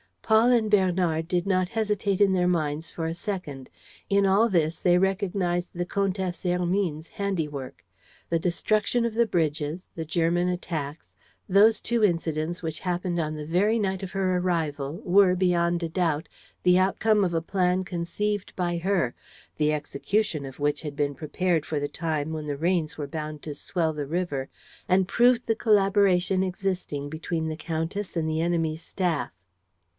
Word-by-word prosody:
Paul 220 +3 +4
and 225 -3 +2
Bernard 180 -5 +2
did 175 0 0
not 185 -2 +2
hesitate 210 -3 0
in 200 -1 +5
their 180 -1 +2
minds 160 -2 -1
for 165 - -4
a 165 - -1
second. 170 - -5 0.4
In 200 0 +3
all 200 +4 +4
this 165 -4 +1
they 175 -1 +4
recognized 185 -2 0
the 175 0 -2
Comtesse 190 -1 -2
Hermine's 180 -3 0
handiwork. 155 -9 -4 0.4
The 165 - +1
destruction 215 +7 +1
of 230 - -1
the 235 +1 +2
bridges, 155 -1 -1
the 160 - -5
German 170 +2 +1
attacks, 160 -4 -4 0.3
those 210 +4 +5
two 235 -1 0
incidents 165 -2 0
which 160 -1 -3
happened 180 -1 -2
on 155 -1 -2
the 150 -1 -6
very 195 +8 +2
night 190 -3 -1
of 190 - -5
her 185 -2 +1
arrival 160 -3 -2
were, 185 0 +5
beyond 175 -1 +1
a 165 - -2
doubt, 165 -2 -1 0.3
the 180 0 +5
outcome 205 +3 +2
of 175 - -1
a 165 - +1
plan 180 +1 +1
conceived 185 +3 -3
by 175 -2 -1
her, 170 -8 0 0.4
the 150 0 +2
execution 150 +2 -1
of 135 +1 -10
which 145 0 +1
had 150 -2 -6
been 145 -1 0
prepared 160 +3 -1
for 150 - -2
the 145 0 -2
time 160 -2 -2
when 155 -1 -4
the 145 -1 -2
rains 165 0 0
were 150 - -3
bound 155 0 -6
to 150 - -5
swell 165 +2 -1
the 145 -2 -4
river 150 -5 -2 0.4
and 185 +1 +3
proved 245 0 +4
the 225 - +1
collaboration 195 -3 +3
existing 185 -6 -2
between 160 +1 -3
the 155 - -4
countess 165 +5 -3
and 160 -2 0
the 160 0 0
enemy's 165 -2 0
staff. 175 - -1
175 Hz, 170 wpm, -26 LUFS, 160-195 Hz, 0.4 s, in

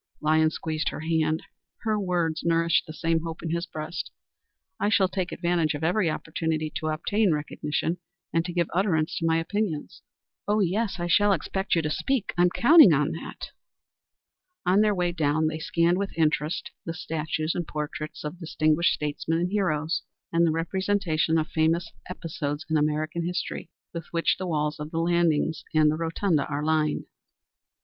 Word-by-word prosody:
Lyons 155 +1 +3
squeezed 155 -1 -2
her - - -6
hand. 160 -1 0 0.4
Her 215 -2 +1
words 175 -4 0
nourished 165 0 +2
the - - -6
same 165 +1 +1
hope 165 0 -6
in 165 - -2
his 170 +1 -1
own - - -41
breast. 155 -1 -5 0.7
"I 205 - +2
shall 200 -3 +4
take 185 -1 -3
advantage 170 -3 0
of 145 - -5
every 175 +2 +2
opportunity 155 0 -2
to 155 - -3
obtain 185 +6 +1
recognition, 150 +2 -2 0.3
and 165 - +2
to 180 - -3
give 170 -2 +1
utterance 175 -3 +1
to 165 - 0
my 165 0 +3
opinions." 165 -2 -2 0.5
"Oh 210 +1 +2
yes, 200 +1 0
I 175 - -1
shall 205 +4 +4
expect 190 +3 -1
you 165 - +1
to 155 - -1
speak. 250 - -1
I 175 - +2
am 180 - +5
counting 240 - +7
on 150 +2 +2
that." 165 - -7 1.1
On 185 +3 +4
their 210 -1 +3
way 175 -1 +1
down 155 -2 +1
they 155 0 -1
scanned 170 +3 +2
with 200 -4 -4
interest 155 0 0
the 165 - -5
statues 155 -1 -2
and 175 -2 -3
portraits 150 0 -5
of 150 +4 -6
distinguished 155 0 +2
statesmen 150 +2 -2
and 175 +2 -1
heroes, 170 -5 0 0.3
and 170 0 +4
the - - +2
representations 170 -1 0
of 155 -1 0
famous 165 +2 +1 0.2
episodes 160 -4 -4
in - - +3
American 155 +2 0
history 175 +1 -3 0.2
with 165 -2 -6
which 170 -1 +1
the 185 - -3
walls 150 -2 -1
of 150 0 -5
the 165 - -5
landings 165 -2 +1
and 155 -1 +5
the - - -1
rotunda 165 -1 0
are 145 0 -3
lined. 155 -1 +1
165 Hz, 175 wpm, -26 LUFS, 155-180 Hz, 1.1 s, counting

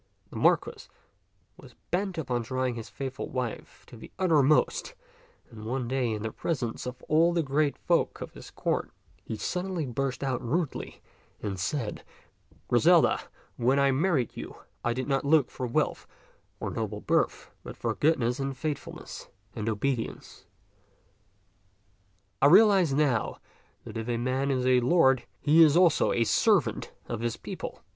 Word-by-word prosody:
The - - -11
Marquis - - +1 0.7
was - - -15 0.2
bent 185 +1 -1
upon 125 -6 -1
trying 130 +2 -2
his 115 -1 -7
faithful 135 -1 -5
wife 125 -3 -5
to - - -14
the 110 - -12
uttermost, 155 - +2 0.6
and 110 -2 -10
one 125 +2 -2
day 130 -1 0
in 105 -1 -3
the 110 - -3
presence 125 -7 -3
of 125 0 -7
all 165 +3 +3
the 170 -1 +1
great 145 +1 0
folk - - 0
of - - -7
his - - -11
court, - - -2 0.3
he 110 - -5
suddenly 180 - -2
burst 130 +1 -3
out 130 -3 -1
rudely 155 +5 -3 0.4
and 100 -3 -4
said, 120 +2 -3 0.3
" - - -32
Griselda, - - +4 0.4
when 125 +3 +2
I 140 0 +4
married 145 - +1
you, - - -7 0.3
I 120 - +1
did 130 +1 -3
not 135 -2 +1
look 145 -2 +3
for 125 - -4
wealth 120 - -1 0.5
or - - -3
noble 110 -2 -4
birth, - - 0
but - - -10
for - - -1
goodness 135 -5 +1
and 135 -1 -3
faithfulness 150 0 -6 0.3
and 110 0 -2
obedience. 115 +2 -3 1.9
I 140 - +7
realize 195 -2 +6
now 135 -5 +1 0.5
that - - -8
if 115 +1 -4
a 120 - 0
man 130 +3 -1
is 130 -2 0
a 130 -1 +5
lord, 130 -1 +3
he 155 +3 +5
is 155 0 +6
also 175 -3 +4
a 115 - +2
servant - - +2 0.2
of 115 - -4
his 120 0 -2
people. - - -7
130 Hz, 155 wpm, -28 LUFS, 120-155 Hz, 1.9 s, I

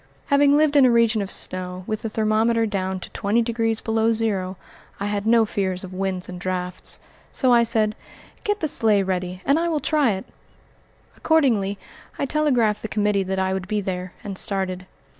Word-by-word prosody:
Having 285 0 +5
lived 305 -1 +3
in 285 - +7
a 255 - +6
region 230 -2 +3
of 195 - -4
snow, 185 -1 -3
with 215 +1 -3
the 225 - -3
thermometer 220 +2 +1
down 190 -3 -2
to - - -8
twenty 215 +4 +1
degrees 225 -1 -1
below 225 0 +1
zero, 195 -5 -1 0.4
I 200 - -2
had 205 0 -2
no 230 0 +5
fears 190 -3 -2
of 190 0 -8
winds 185 -1 -2
and 180 -1 -8
drifts, 180 -1 -3 0.3
so 255 -3 +4
I 235 - +6
said, 220 -2 +3 0.5
"Get 415 0 -1
the 315 - +1
sleigh 215 -7 +2
ready 185 -1 -3
and 280 +3 +3
I 340 - 0
will 315 -2 0
try 290 -7 +2
it." 190 - -6 0.9
Accordingly 230 -11 +2 0.4
I - - -1
telegraphed 255 -8 +1
the - - -4
committee 210 -1 +1
that 190 0 -3
I 190 0 0
would 190 -1 -4
be 210 0 -1
there, 185 -2 -4
and 195 -2 -4
started. 185 -2 -1
210 Hz, 190 wpm, -23 LUFS, 190-235 Hz, 0.9 s, in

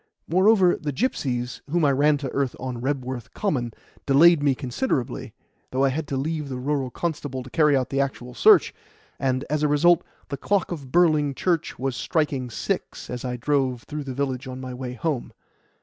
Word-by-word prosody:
Moreover, 190 +1 +4
the 150 - -3
gipsies, 130 - -2
whom 165 +1 +2
I 140 - +4
ran 145 +2 +3
to 140 -2 -4
earth 135 -2 -1
on 125 -2 -5
Rebworth 130 -3 -3
Common, 130 - -1 0.4
delayed 155 +3 +6
me 140 -2 +3
considerably, 130 - -2 0.3
though 130 +1 0
I 135 - +4
had 150 +3 -3
to 135 - -2
leave 150 +1 -2
the 130 - -4
rural 135 0 -1
constable 145 -4 -4
to 130 - -12
carry 150 -3 +4
out 130 - -1
the 135 0 +2
actual 125 -2 -4
search, - - +5 0.5
and, 130 -1 0
as 150 +1 -1
a 150 - +3
result, 170 +4 +4 0.3
the 140 - -3
clock 200 +6 0
of 140 -7 -6
Burling 155 -5 +3
Church 170 0 -1
was 135 -1 -2
striking 145 -6 -1
six 115 - -4
as 125 -1 -5
I 125 -1 -3
drove 130 -2 0
through 150 -2 -6
the 130 -2 -5
village 135 -1 -2
on 130 0 -6
my 130 -1 -6
way 125 0 -5
home. 145 -1 -2
140 Hz, 190 wpm, -24 LUFS, 130-155 Hz, 0.5 s, delayed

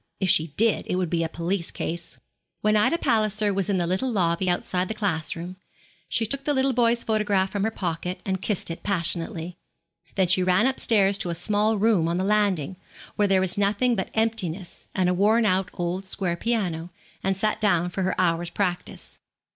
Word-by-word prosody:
If 190 -3 +2
she 160 - +3
did, 225 0 +2
it - - 0
would 180 -3 -1
be 165 -1 +1
a 165 - -2
police 170 +2 -2
case.' 170 +1 -6 0.4
When 215 0 +2
Ida 215 +10 +3
Palliser 215 -5 +1
was 195 -1 -1
in 195 - +1
the 175 - 0
little 190 +9 -1
lobby 180 -3 +1
outside 180 +1 -1
the 220 - -4
class 170 -8 -1
room, 175 +2 -7 0.5
she 225 - 0
took 275 +5 -2
the 290 0 0
little 265 0 +2
boy's 235 -1 +2
photograph 205 -3 +1
from 205 -2 -2
her - - +1
pocket, 180 -3 -3
and 190 -1 -2
kissed 195 -4 -1
it 165 - -7
passionately. 175 -2 -1 0.6
Then 190 - +3
she 185 +1 +3
ran 185 +4 +3
upstairs 205 -6 +3
to 180 - -2
a 170 - -2
small 210 +5 +1
room 205 -5 +2
on 170 +1 -1
the 185 - 0
landing, 195 -5 +1 0.4
where 205 - +2
there 190 -1 +3
was 190 +1 +2
nothing 210 +5 +2
but 190 - -3
emptiness 210 -6 -2
and 185 -1 +2
a 180 - +2
worn 215 +5 +3
out 185 -2 +1
old 175 +2 -3
square 185 -2 -1
piano, 180 -6 -2 0.3
and 195 0 0
sat 215 +2 0
down 180 -4 +2
for 190 - -3
her 185 0 -1
hour's 170 -1 +1
practice. 180 -2 -4
190 Hz, 200 wpm, -25 LUFS, 175-215 Hz, 0.6 s, she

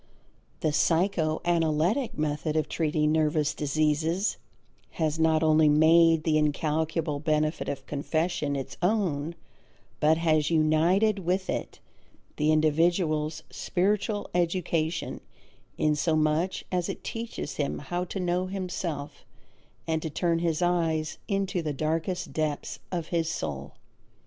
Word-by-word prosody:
The 155 - +1
psycho 160 0 +1
analytic 170 - +1
method 150 +1 -1
of 155 - +1
treating 155 -1 0
nervous 155 -1 +1
diseases 155 +6 0 0.6
has 160 -1 -1
not 160 0 +3
only 155 -1 +5
made 160 +1 +5
the 155 -1 +2
incalculable 155 0 0
benefit 155 +1 0
of 135 -1 -5
confession 155 +1 -1
its 135 -1 -5
own 175 -6 0 0.6
but 155 +1 +4
has 155 -2 +2
united 170 +7 +3
with 185 +1 -1
it - - -4 0.6
the 150 +1 +2
individual's 155 0 +1
spiritual 205 +3 -1
education 170 -2 -1 0.6
inasmuch 155 +3 +1
as 180 -2 -1
it - - -6
teaches 230 0 -5
him 145 - -1
how 175 +6 -3
to 190 - -5
know 180 0 0
himself 180 -6 -4 0.6
and 160 -1 -1
to 160 - -3
turn 165 +2 0
his 170 0 0
eyes 165 -3 0
into 195 -3 -1
the 155 -2 -2
darkest 160 +5 -2
depths 155 -2 -2
of 170 -3 -3
his 165 -2 0
soul. 70 - -4
160 Hz, 120 wpm, -27 LUFS, 155-175 Hz, 0.6 s, only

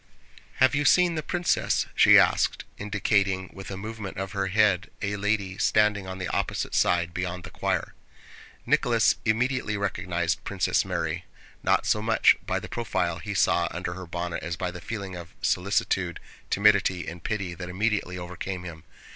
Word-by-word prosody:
"Have 130 0 +4
you 145 +1 +1
seen 175 +4 +5
the 155 - -2
princess?" 175 +2 0
she - - +7
asked, - - +3 0.2
indicating 100 -2 0
with 95 0 -9
a 95 - -5
movement 105 -1 -6
of 95 0 -4
her 100 -2 -1
head 100 -2 +2
a 100 -1 -2
lady 100 -2 -1
standing 105 -2 +2
on 95 0 -5
the 90 -1 -3
opposite - - -2
side, 85 -1 +2
beyond 90 0 -3
the - - -9
choir. - - -2 0.7
Nicholas - - +3
immediately 115 -1 0
recognized 90 -2 -1
Princess 95 -3 +1
Mary - - -3 0.4
not - - +2
so 105 - +2
much 115 +1 +4
by - - 0
the - - -8
profile 90 -8 -2
he 105 +4 -5
saw 85 -2 +3
under 90 +1 -4
her 95 0 -8
bonnet 85 0 -4
as 85 +1 -3
by 90 0 -2
the 90 0 -9
feeling 100 -5 -5
of 85 -1 -10
solicitude, 90 -1 0 0.3
timidity, 100 -3 +3
and 85 0 -7
pity 100 -5 -2
that 90 +1 -7
immediately 100 -1 -1
overcame 90 +1 -5
him. 80 -3 -9
95 Hz, 165 wpm, -26 LUFS, 90-105 Hz, 0.7 s, she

